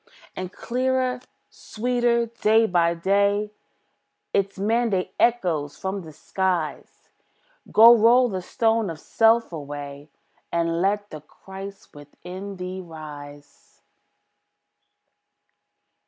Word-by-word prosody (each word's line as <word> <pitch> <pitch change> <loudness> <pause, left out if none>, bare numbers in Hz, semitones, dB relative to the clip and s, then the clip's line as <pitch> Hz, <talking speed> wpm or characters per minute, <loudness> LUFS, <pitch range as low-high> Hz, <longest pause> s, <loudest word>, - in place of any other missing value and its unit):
And 185 -1 -5
clearer, 255 +2 -1 0.3
sweeter, 240 +1 0
day 225 -1 +2
by 170 -4 +2
day, 200 +4 +1 0.8
Its 200 0 0
mandate 205 -3 0
echoes 175 -12 +1
from 190 +1 -4
the 160 -3 -11
skies, 180 0 -3 0.6
"Go 230 +2 +9
roll 240 +3 +5
the 190 -5 -4
stone 225 +2 0
of 160 -2 -7
self 225 +5 +2
away, 145 -1 -7 0.4
And 170 0 0
let 205 +2 0
the 155 - -8
Christ 195 +5 -11
within 180 +7 -9
thee 185 0 -6
rise." 145 -3 -12
195 Hz, 95 wpm, -24 LUFS, 165-225 Hz, 0.8 s, Go